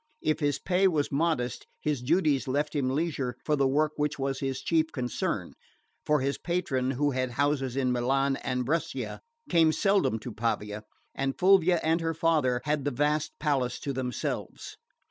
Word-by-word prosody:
If 155 0 +1
his 145 -2 +1
pay 190 +1 +2
was 155 -5 0
modest 145 -4 -1
his 150 -4 -1
duties 150 -1 +2
left 145 +3 -1
him 135 -3 +1
leisure 135 -4 -1
for 150 - +2
the 140 -2 +2
work 150 +3 +2
which 150 0 -1
was 135 -1 -2
his 135 -1 -2
chief 160 -1 +1
concern; 125 -2 -2 0.5
for 150 -2 +3
his 140 +1 -1
patron, 155 -8 -1
who 145 +1 +2
had 130 -1 -1
houses 135 -1 0
in 130 -2 +1
Milan 135 +3 +1
and 125 -1 -2
Brescia, 165 +6 -2 0.3
came 165 -2 +4
seldom 195 - +2
to 120 - -6
Pavia, 105 -2 -2 0.3
and 135 0 -2
Fulvia 185 -2 +5
and 160 +2 +2
her 165 0 -1
father 150 -7 +2
had 150 -1 0
the 145 - +1
vast 150 +3 0
palace 135 -5 0
to 140 - -3
themselves. 125 -2 -4
145 Hz, 170 wpm, -28 LUFS, 130-155 Hz, 0.5 s, Fulvia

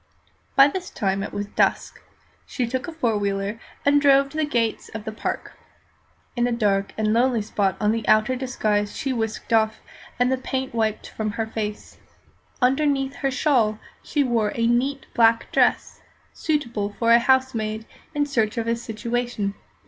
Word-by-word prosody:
By 275 0 +8
this 360 +5 -4
time 195 -1 -1
it 200 - -4
was 205 0 -3
dusk. 205 - 0 0.5
She 250 - -2
took 255 +6 -3
a - - -4
four 235 -10 0
wheeler 200 +2 -2 0.3
and 285 0 +5
drove 275 -1 +5
to 310 - -8
the 310 - +2
gates 230 -5 -1
of 220 - -6
the 220 - -3
Park. 215 - -4 0.8
In 240 -1 +2
a - - -1
dark 200 -4 +1
and 215 0 +1
lonely 235 -1 +2
spot 195 -2 0
the 220 +1 0
outer 215 +4 +4
disguise 215 -5 -1
was 270 - +1
whisked 225 0 -3
off, 220 -1 +2 0.4
and 245 +1 +2
the 260 - +2
paint 265 -1 -3
wiped 220 -2 -1
from 215 -1 -3
her 225 - -2
face. 215 -1 -5 0.6
Underneath 270 +1 +1
her 275 - 0
shawl 255 -6 +2 0.2
she 295 -2 0
wore 230 -5 +1
a 230 - +1
neat 260 +4 +1
black 230 -1 +3
dress, - - +1 0.3
suitable 235 -10 -2
for 230 0 +2
a 235 - +8
housemaid 235 -4 +1 0.3
in 290 0 +2
search 230 -5 0
of 230 - -1
a 230 - +2
situation. 235 -2 -3
230 Hz, 170 wpm, -23 LUFS, 215-260 Hz, 0.8 s, By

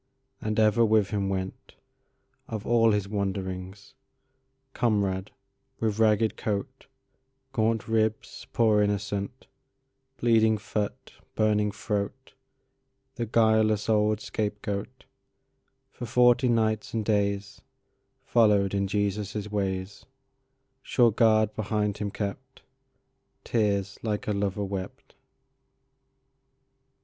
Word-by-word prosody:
And 110 0 -1
ever 110 +1 +4
with 110 -3 +3
Him 100 -2 -1
went, 95 -1 -5 0.7
Of 110 -2 -5
all 115 -1 +4
His 105 -2 0
wanderingsComrade, 105 +3 -4 0.5
with 110 -1 -1
ragged 110 0 +3
coat, 110 +4 -4 0.7
Gaunt 115 -2 0
ribs—poor 110 0 +1
innocent—Bleeding 115 +3 -1
foot, 105 +1 -4 0.2
burning 105 -1 +2
throat, 105 +5 -4 0.8
The 120 -3 -4
guileless 110 -1 +3
old 105 0 +2
scapegoat; 105 +3 -4 0.9
For 120 - -7
forty 125 +2 +4
nights 110 -2 0
and 110 -2 -1
daysFollowed 100 0 0
in 100 0 0
Jesus' 105 +1 -2
ways, 95 -1 -3 0.7
Sure 120 -3 +3
guard 110 -1 +3
behind 105 -1 -1
Him 105 - -2
kept, 100 0 -6 0.8
Tears 105 -3 0
like 105 -2 -3
a - - +1
lover 100 0 -1
wept. 95 -1 -7
105 Hz, 90 wpm, -27 LUFS, 100-115 Hz, 0.9 s, ever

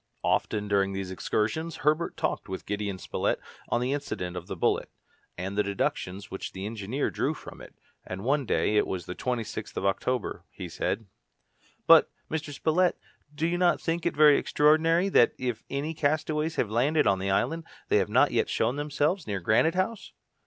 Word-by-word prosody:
Often 105 -1 0
during 100 -1 +2
these 95 -1 -4
excursions, 150 - -1
Herbert 155 +3 +1
talked - - -2
with 95 - -5
Gideon 105 -1 -3
Spilett - - -1 0.3
on 120 - +1
the 130 +2 0
incident 90 -11 -4
of 90 0 -6
the - - -4
bullet, 85 - +1 0.5
and 95 +3 -4
the 105 - +3
deductions 100 -1 -2
which 95 - -5
the 95 +1 -5
engineer 110 +5 -2
drew - - -1
from - - -11
it, - - -13 0.3
and 95 +1 -6
one 140 +1 +1
day 105 - +2
it - - +3
was 90 -3 -4
the 90 - -5
26th 115 -2 -4
of - - -2
October 120 +4 -1
he - - -7
said, 110 - -2 0.8
"But, - - +7 0.2
Mr. 155 -2 -3
Spilett, 165 +5 +2 0.4
do 155 +2 -1
you 175 +1 0
not 180 -1 +3
think 165 0 -1
it 170 - -1
very 150 -1 +7
extraordinary 165 +4 +3
that, 120 - +4
if 125 -3 -3
any 145 +4 -2
castaways 155 +1 0
have 105 - 0
landed 145 +7 +2
on 95 -1 +3
the 95 +1 -2
island, 150 +12 0 0.2
they - - +4
have - - +1
not - - +4
yet - - +1
shown 120 +5 0
themselves 150 - 0
near 100 -2 -2
Granite 110 - +3
House?" 195 +4 -2
125 Hz, 185 wpm, -28 LUFS, 100-155 Hz, 0.8 s, But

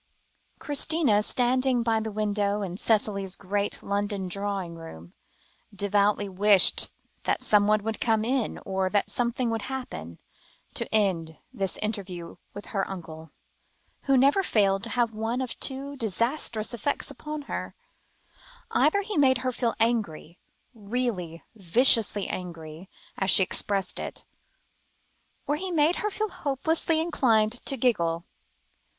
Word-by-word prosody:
Christina, 290 -6 +2
standing 250 +2 +1
by 225 -1 +1
the 220 0 -4
window 205 -1 -1
in 180 -2 -5
Cicely's 200 -3 +1
great 200 +2 -2
London 200 -1 -2
drawing 195 -2 -3
room, 90 - -11 0.6
devoutly 205 +1 +1
wished 195 0 +4 0.4
that - - 0
somebody 210 0 +3
would 225 0 -4
come 220 -2 +2
in, 255 -1 -1
or 190 -1 -1
that 205 +1 0
something 240 0 0
would 225 -1 -2
happen, 245 - -6 0.5
to - - -3
end 175 -7 0 0.2
this 195 -6 -1
interview 190 -5 -5
with 205 - -9
her 195 -2 -1
uncle, 160 -4 -8 0.8
who 275 -1 +4
never 280 +9 +4
failed 200 - +2
to - - -7
have 240 -2 +1
one 225 +3 -2
of 255 -2 -4
two 275 +1 -2
disastrous 230 - -1
effects 240 +5 -2
upon 300 -1 -6
her: - - -5 1.0
either 405 - +3
he 415 -3 -4
made 265 -3 +4
her 255 - +1
feel 235 -1 -1
angry 210 -8 -1 0.3
really 205 -7 -3
viciously 215 +1 +4
angry, 165 -1 -7 0.3
as 195 - +1
she 190 - +7
expressed 195 +1 -2
it - - -7 1.2
or 295 - 0
he 375 +3 -4
made 325 0 +2
her 420 - -1
hopelessly 320 -5 0
inclined 230 -10 +2 0.2
to 275 - +4
giggle. 170 -9 +1
215 Hz, 130 wpm, -26 LUFS, 195-255 Hz, 1.2 s, she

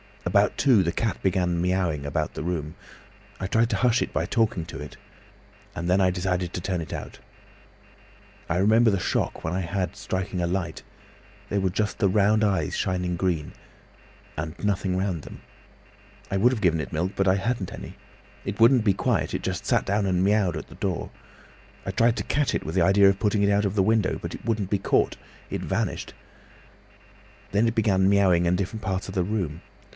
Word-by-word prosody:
About - - +2
two, 125 -8 +5
the 85 - 0
cat 110 +2 -2
began 90 -2 +1
miaowing 90 -5 0
about 70 - -2
the - - -4
room. 80 -2 -3 0.6
I 95 - -3
tried 115 +3 +2
to - - +1
hush 125 -1 +2
it - - -3
by - - 0
talking 110 -8 0
to 80 -4 -8
it, 75 -2 -8 0.8
and 85 +1 -3
then 90 +2 +4
I 95 -1 +4
decided 90 -1 -2
to 90 - -3
turn 90 0 -2
it 80 - -6
out. - - -7 1.3
I 85 - +1
remember 110 +5 +4
the 100 -3 +1
shock - - -1
I 90 +4 -1
had 95 +1 -2
when - - -21
striking 95 -2 -3
a 85 - 0
light—there 90 +2 -6
were 95 -1 +1
just 105 +3 -2
the 100 - +3
round 105 +2 +3
eyes 95 -8 +1
shining 90 -1 -1
green—and 80 -1 -6
nothing 95 -2 0
round 95 -4 -1
them. - - -11 0.9
I 95 - +1
would 120 +6 +4
have 120 -5 -3
given 85 -5 +2
it 70 - -7
milk, 85 +4 -1
but 95 - +1
I 95 - +5
hadn't 100 -1 -2
any. - - -9 0.5
It 100 +2 -4
wouldn't 120 +1 +6
be 100 - +4
quiet, - - 0
it - - -3
just - - -3
sat - - +2
down 100 +1 +1
and 90 -1 +1
miaowed 100 -2 +2
at - - -6
the - - -13
door. - - -3 0.7
I 95 - -2
tried 115 +3 +3
to - - -2
catch 145 -1 0
it, - - -2
with 80 - -5
an 90 - +5
idea 100 +1 +6
of 100 0 0
putting 105 -1 +1
it 100 - +3
out 100 +1 +2
of 100 0 -1
the 95 - +3
window, 110 -2 +2
but - - -5
it - - -9
wouldn't 110 -5 -1
be 100 - +1
caught, - - +1 0.3
it - - -3
vanished. - - -2 1.4
Then 105 +4 +3
it 115 - -1
began 95 -4 +3
miaowing 95 -4 +4
in 85 +1 +3
different 100 +4 -3
parts 95 -1 -2
of 95 - -7
the 90 - +2
room. 90 -5 -3
95 Hz, 200 wpm, -25 LUFS, 90-105 Hz, 1.4 s, wouldn't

